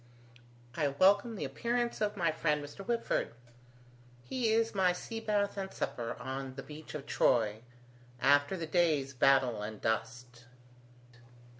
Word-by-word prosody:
I 150 Hz, -, +1 dB
welcome 200 Hz, -, +3 dB
the -, -, -3 dB
appearance 235 Hz, -, -2 dB
of 210 Hz, -1 st, 0 dB
my 170 Hz, -3 st, +2 dB
friend 150 Hz, -2 st, 0 dB
Mr. 145 Hz, +7 st, -9 dB
Whitford. 230 Hz, -, -1 dB, 0.9 s
He 245 Hz, -, -1 dB
is 225 Hz, 0 st, +2 dB
my 185 Hz, -3 st, +3 dB
sea 225 Hz, +5 st, -6 dB
bath 205 Hz, -2 st, 0 dB
and 190 Hz, -1 st, -4 dB
supper 115 Hz, -1 st, -3 dB
on 130 Hz, 0 st, -5 dB
the 135 Hz, -, -7 dB
beach 155 Hz, +1 st, -10 dB
of 140 Hz, -2 st, -6 dB
Troy, 110 Hz, -3 st, +2 dB, 0.6 s
after 145 Hz, +7 st, +3 dB
the 165 Hz, -, -3 dB
day's 155 Hz, -4 st, +1 dB
battle 130 Hz, -4 st, +3 dB
and 105 Hz, 0 st, -6 dB
dust." 120 Hz, +2 st, -3 dB
150 Hz, 140 wpm, -32 LUFS, 130-200 Hz, 0.9 s, welcome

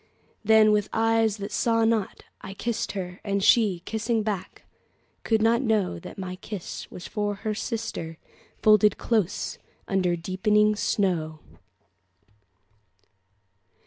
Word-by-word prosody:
Then, 220 Hz, 0 st, +6 dB
with 210 Hz, -1 st, +1 dB
eyes 225 Hz, -1 st, +2 dB
that 200 Hz, 0 st, -6 dB
saw 230 Hz, -1 st, +2 dB
not, 225 Hz, -3 st, -1 dB, 0.2 s
I 195 Hz, 0 st, -8 dB
kissed 235 Hz, +2 st, -3 dB
her; 180 Hz, -2 st, -6 dB
And 200 Hz, -1 st, -1 dB
she, 200 Hz, -7 st, +4 dB
kissing 220 Hz, 0 st, -1 dB
back, 200 Hz, -3 st, -4 dB, 0.6 s
could 220 Hz, -1 st, +1 dB
not 230 Hz, +2 st, +3 dB
knowThat 210 Hz, -, -1 dB
my 185 Hz, -1 st, -5 dB
kiss 200 Hz, -2 st, -7 dB
was 180 Hz, -, -9 dB
given 205 Hz, -1 st, -2 dB
to 200 Hz, -, -19 dB
her 215 Hz, -, -1 dB
sister, 210 Hz, -7 st, -4 dB, 0.5 s
Folded 215 Hz, -1 st, +5 dB
close 210 Hz, -5 st, -1 dB, 0.3 s
under 185 Hz, -4 st, +1 dB
deepening 210 Hz, +5 st, +2 dB
snow. 175 Hz, -7 st, 0 dB
210 Hz, 120 wpm, -26 LUFS, 190-220 Hz, 0.6 s, Then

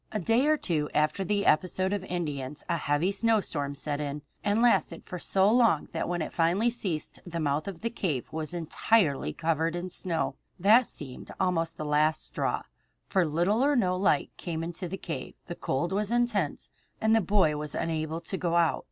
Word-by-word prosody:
A 215 Hz, -, -1 dB
day 230 Hz, -, +2 dB
or 310 Hz, 0 st, +4 dB
two 155 Hz, -, -1 dB
after 155 Hz, +6 st, +2 dB
the 200 Hz, +2 st, 0 dB
episode 185 Hz, +4 st, +2 dB
of 205 Hz, -, -1 dB
the 190 Hz, -, -10 dB
Indians 150 Hz, -5 st, -3 dB
a 170 Hz, -, +1 dB
heavy 150 Hz, +4 st, +1 dB
snowstorm 195 Hz, -10 st, 0 dB
set 145 Hz, +1 st, -3 dB
in, 145 Hz, 0 st, -4 dB, 0.2 s
and 205 Hz, +2 st, +2 dB
lasted 240 Hz, 0 st, +2 dB
for 180 Hz, -2 st, -6 dB
so 190 Hz, +3 st, +2 dB
long 230 Hz, -10 st, +3 dB
that -, -, -2 dB
when 175 Hz, -2 st, -1 dB
it -, -, -6 dB
finally 180 Hz, +8 st, +2 dB
ceased 185 Hz, -10 st, -2 dB
the 170 Hz, -1 st, -5 dB
mouth 150 Hz, +2 st, 0 dB
of 185 Hz, -4 st, -6 dB
the 230 Hz, -, -1 dB
cave 160 Hz, -, -2 dB
was 155 Hz, -1 st, -4 dB
entirely 170 Hz, -1 st, +1 dB
covered 165 Hz, +1 st, 0 dB
with 180 Hz, +1 st, -4 dB
snow. 170 Hz, -2 st, -2 dB, 0.2 s
That 220 Hz, +7 st, +6 dB
seemed 130 Hz, -4 st, -8 dB
almost 165 Hz, -3 st, 0 dB
the 155 Hz, -, -4 dB
last 150 Hz, +1 st, +2 dB
straw, -, -, -2 dB, 0.4 s
for 185 Hz, -4 st, +2 dB
little 175 Hz, +9 st, +1 dB
or 290 Hz, +1 st, +3 dB
no 185 Hz, -7 st, +2 dB
light 195 Hz, +2 st, +2 dB
came 165 Hz, -2 st, -4 dB
into 175 Hz, +2 st, -4 dB
the 190 Hz, -, -4 dB
cave, -, -, -6 dB
the 175 Hz, -, -5 dB
cold 170 Hz, +1 st, -2 dB
was 205 Hz, +1 st, 0 dB
intense, 235 Hz, -9 st, 0 dB, 0.3 s
and 220 Hz, 0 st, +3 dB
the 225 Hz, -, +4 dB
boy 190 Hz, -5 st, +3 dB
was 150 Hz, 0 st, -3 dB
unable 160 Hz, 0 st, -2 dB
to 190 Hz, -, -4 dB
go 170 Hz, -2 st, -1 dB
out. 170 Hz, -2 st, +3 dB
175 Hz, 195 wpm, -28 LUFS, 155-200 Hz, 0.4 s, That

